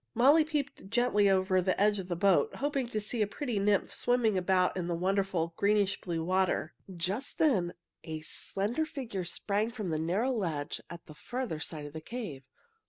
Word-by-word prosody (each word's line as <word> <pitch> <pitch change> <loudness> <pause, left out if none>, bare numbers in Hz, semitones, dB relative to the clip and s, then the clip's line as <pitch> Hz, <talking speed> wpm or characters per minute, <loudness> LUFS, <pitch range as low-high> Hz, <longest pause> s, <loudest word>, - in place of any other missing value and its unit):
Molly 280 +7 +6
peeped 290 -10 -3
gently 215 -3 +3
over 190 -1 +3
the 185 +1 0
edge 205 0 +3
of 185 - -5
the 175 - -2
boat, 195 +2 +3
hoping 280 -3 -1
to 220 -3 -2
see 215 +2 -2
a 210 - +3
pretty 240 -1 -2
nymph 200 0 +2
swimming 245 -4 +2
about 185 0 +2
in 180 -2 -2
the 175 - -1
wonderful 185 -2 0
greenish 205 -1 +2
blue 165 -3 -2
water. 185 -2 +1 0.2
Just 195 +10 -2
then 195 - +2 0.3
a 155 -1 -5
slender 210 - -2
figure 245 - -4
sprang 205 +5 -1
from 215 -8 -4
a 155 - 0
narrow 190 +11 +1
ledge 165 - -2
at 170 -1 -9
the 155 - -11
farther 240 -1 -4
side 155 -2 -5
of 145 - -9
the 160 - -6
cave. 165 - -6
195 Hz, 185 wpm, -31 LUFS, 175-235 Hz, 0.3 s, Molly